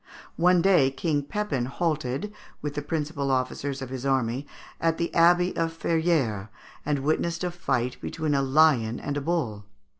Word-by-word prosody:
One 180 0 +4
day 180 -9 +5
King 145 +2 -1
Pepin 145 -4 -2
halted, 155 +4 -2 0.3
with 145 -1 -4
the 145 - -3
principal 150 -1 -2
officers 135 +1 -1
of 130 - -8
his 130 -1 -5
army, 135 0 0 0.3
at 165 -1 +1
the 170 - -2
Abbey 175 +2 +4
of 165 0 -1
Ferrières, 155 - 0 0.3
and 145 -2 -1
witnessed 170 +3 0
a 180 - -1
fight 125 -7 -2
between 155 -2 -2
a 140 - +2
lion 135 -5 +3
and 145 - -4
a 145 - -1
bull. 130 -11 -2
145 Hz, 160 wpm, -26 LUFS, 130-165 Hz, 0.3 s, day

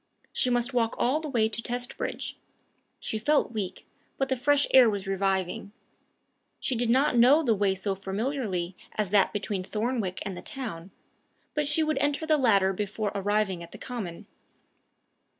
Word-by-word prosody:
She 255 - +2
must 245 +2 +1
walk 230 -2 +1
all 265 +5 +2
the 315 -1 -5
way 230 -5 +2
to 225 +1 -5
Testbridge. 245 +1 -3 0.7
She 220 - -3
felt 290 +2 +2
weak, 205 -5 -4 0.3
but 270 - 0
the 265 - +2
fresh 285 +3 +3
air 255 -3 +8
was 200 -2 -3
reviving. 195 0 -1 0.9
She 260 - -1
did 240 0 0
not 260 0 +3
know 275 +7 +6
the 235 -6 +3
way 200 -2 +1
so 195 +1 -1
familiarly 195 -2 -2 0.2
as 210 -3 -1
that 205 -2 +4
between 205 -2 -3
Thornwick 215 -1 -2
and 195 -2 -4
the - - -7
town, 200 -10 -6 0.6
but 300 -1 0
she 300 +2 +2
would 310 -2 0
enter 290 +2 0
the 310 -1 +3
latter 200 -7 +4
before 205 +1 -2
arriving 200 -2 0
at 170 - -11
the - - -8
common. 210 -10 -6
220 Hz, 170 wpm, -28 LUFS, 195-260 Hz, 0.9 s, air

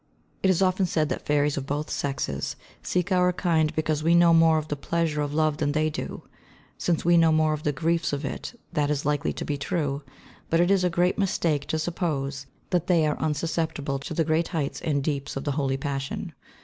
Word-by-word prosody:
It 190 - +3
is 185 0 +3
often 185 0 +2
said 155 -3 0
that - - -4
fairies 145 0 +2
of 135 -1 -4
both 145 +2 -2
sexes 135 - -2 0.3
seek 180 +2 -1
our 180 -1 +4
kind 165 -4 +1
because 155 -1 0
we 165 +2 +4
know 170 -1 +6
more 165 -1 +5
of 155 0 -2
the 150 - -2
pleasure 155 +1 -1
of 145 -1 -2
love 155 0 +1
than 145 -2 0
they 155 +1 +1
do. - - -5 0.6
Since 170 -2 0
we 175 0 +5
know 165 -1 +5
more 155 0 +3
of 150 - -4
the 150 - 0
griefs 165 +3 0
of 145 0 -3
it 235 - -6
that 150 -3 +1
is 145 -1 -1
likely 145 -1 +1
to - - -5
be 145 -1 -2
true; 145 -2 -1 0.5
but 165 - +2
it 175 +2 +3
is 195 -2 +3
a 180 - +3
great 175 +3 +1
mistake 165 -7 0
to 160 - -1
suppose 145 -5 -2 0.2
that 175 -1 +1
they 170 -4 +4
are 150 - -1
unsusceptible 155 -2 -1
to 150 +3 -6
the 165 - +2
great 165 +1 +1
heights 155 -6 -3
and 145 -5 0
deeps 140 -2 -2
of 135 - -3
the 145 - -1
holy 135 -1 0
passion. 135 0 -4
155 Hz, 220 wpm, -26 LUFS, 145-170 Hz, 0.6 s, know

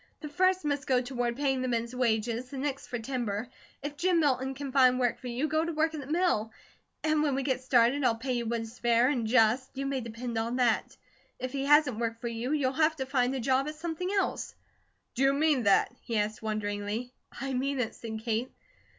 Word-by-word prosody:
The 300 - -6
first 370 +2 +2
must 285 -2 -1
go 255 -2 +4
toward 245 -1 -2
paying 270 -1 0
the 255 - -1
men's 235 0 -1
wages, 235 0 0
the 275 - -7
next 275 0 -3
for 245 - -3
timber. 230 -2 -3 0.4
If 290 0 -5
Jim 355 +1 +2
Milton 265 -3 +1
can 275 -1 -5
find 255 -2 +5
work 245 -2 +1
for 255 - -8
you, 245 +5 -1
go 315 +1 +1
to 335 0 -3
work 320 +1 +1
at 310 - -4
the 270 - -8
mill, 310 -9 +1 0.5
and 310 -1 +2
when 290 -3 +1
we 270 - -1
get 260 -1 0
started 255 +2 +3
I'll 235 -3 +3
pay 255 +3 -3
you 240 -2 -2
what 230 0 -1
is 225 +2 -9
fair 240 +1 +4
and 245 -6 0
just, 245 +3 +3
you 275 - -2
may 275 -1 -1
depend 230 0 -4
on 230 +2 -2
that. 245 -3 +1 0.4
If 255 - -4
he 275 0 -2
hasn't 290 -5 +4
work 230 -1 -2
for 235 - -3
you, 235 +3 -3
you'll 280 -4 +1
have 315 +2 +2
to 265 -3 -3
find 260 -1 +1
a - - -2
job 265 +3 +1
at 305 - -5
something 335 +3 -4
else." 400 -1 -1 0.6
"Do 255 - -3
you 270 0 +5
mean 295 -2 +2
that?" 200 +3 +4
he 230 -3 -3
asked 210 +1 -1
wonderingly. 215 +2 -3 0.3
"I 270 0 -3
mean 270 +2 -1
it," 235 -3 -1
said 220 -1 -7
Kate. 230 +2 -1
255 Hz, 230 wpm, -29 LUFS, 235-285 Hz, 0.6 s, find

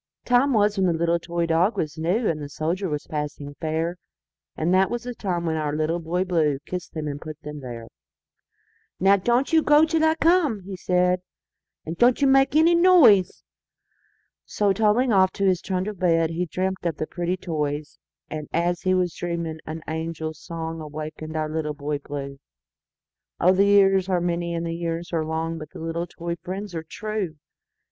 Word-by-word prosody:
Time 250 +3 +3
was 210 -3 +2
when 190 - +3
the 175 - +2
little 170 +1 +1
toy 170 0 -2
dog 165 +6 +2
was 155 -2 -2
new, 180 +8 0
And 155 -2 -1
the 145 - -6
soldier 170 +6 -2
was 150 -1 -3
passing 150 -1 -5
fair; 165 +2 -1 0.6
And 165 +3 +1
that 190 +1 +4
was 240 0 -3
the 245 0 -5
time 180 -6 -3
when 160 -1 0
our 150 -1 -1
Little 155 +2 0
Boy 175 +2 -1
BlueKissed 165 0 -1
them 155 -2 -4
and 145 0 -5
put 155 -1 -8
them 150 0 -7
there."Now 130 +9 -4
don't 240 - +1
you 320 - +6
go 300 +1 +5
till 320 0 0
I 315 0 +4
come," 325 - +2
he 195 +1 -7
said,"And 180 -2 -3
don't 240 +1 +5
you 285 - +3
make 270 +1 +4
any 325 +2 +5
noise!"So, 235 - +1
toddling 225 +4 +2
off 190 -1 +4
to 200 - -1
his 185 -2 +2
trundle 190 +2 -2
bed, 165 -3 +2
He 175 +2 -2
dreamt 185 +3 -2
of 165 -3 -2
the - - -2
pretty 175 +3 -2
toys; 150 -4 -3 0.3
And, 155 -1 -6
as 175 +1 0
he 185 0 +2
was 180 -2 0
dreaming, 170 -2 -4
an 160 +1 -6
angel 160 0 -3
songAwakened 155 -1 -6
our 155 -1 -1
Little 155 -1 -3
Boy 145 0 -3
Blue—Oh! 140 +5 -5
the 195 +1 +4
years 195 -2 +4
are 180 -2 +2
many, 170 -1 -1
the 165 0 -3
years 170 +1 -4
are 160 -1 +1
long, 160 +1 -3
But 155 -1 -8
the - - -12
little 165 +1 -3
toy 170 0 -5
friends 190 +2 -6
are 165 - -3
true! 205 0 -4
170 Hz, 175 wpm, -24 LUFS, 160-195 Hz, 0.6 s, you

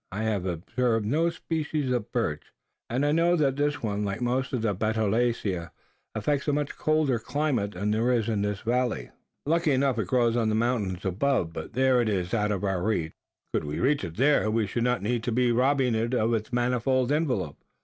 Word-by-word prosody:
I 105 +4 -3
have 105 -4 -1
observed 110 +6 -1
no 155 +9 +2
species 155 -4 -2
of 120 -4 -2
birch; - - -1 0.4
and 130 +5 0
I 145 - +2
know 170 +3 +3
that 140 -5 +2
this 145 -1 -1
one, 105 -1 -1
like 100 -1 -2
most 125 +1 -1
of 125 -4 -2
the 105 -3 +1
Betulaceae, 110 -3 0 0.5
affects 140 +7 -1
a 145 - +2
much 145 0 -2
colder 155 -6 +1
climate 125 -6 -1
than 100 +4 -1
there 115 +4 +2
is 115 -4 +1
in 110 -3 0
this 105 -1 -2
valley. 120 - -1 0.3
Likely 165 0 +2
enough, 130 -3 +1
it 105 - -1
grows 120 +2 +2
on 115 -2 +1
the 110 - +1
mountains 110 -6 -1
above; 95 -2 0
but - - -7
there 130 -1 +3
it 115 - 0
is 90 -3 -2
out 105 -2 +1
of 100 -2 -2
our 95 -3 0
reach. 90 -6 -1 0.4
Could - - 0
we 75 0 -4
reach 145 +3 +2
it 85 +2 -6
there, 135 -3 +3
we 110 0 +1
should 115 +4 -2
not 125 -4 0
need 120 +2 0
to 120 - -2
be 125 +1 +2
robbing 130 +1 +2
it 115 +3 0
of 115 0 +1
its 110 0 -2
manifold 125 +1 +1
envelope. 125 - -1
120 Hz, 210 wpm, -27 LUFS, 105-135 Hz, 0.5 s, know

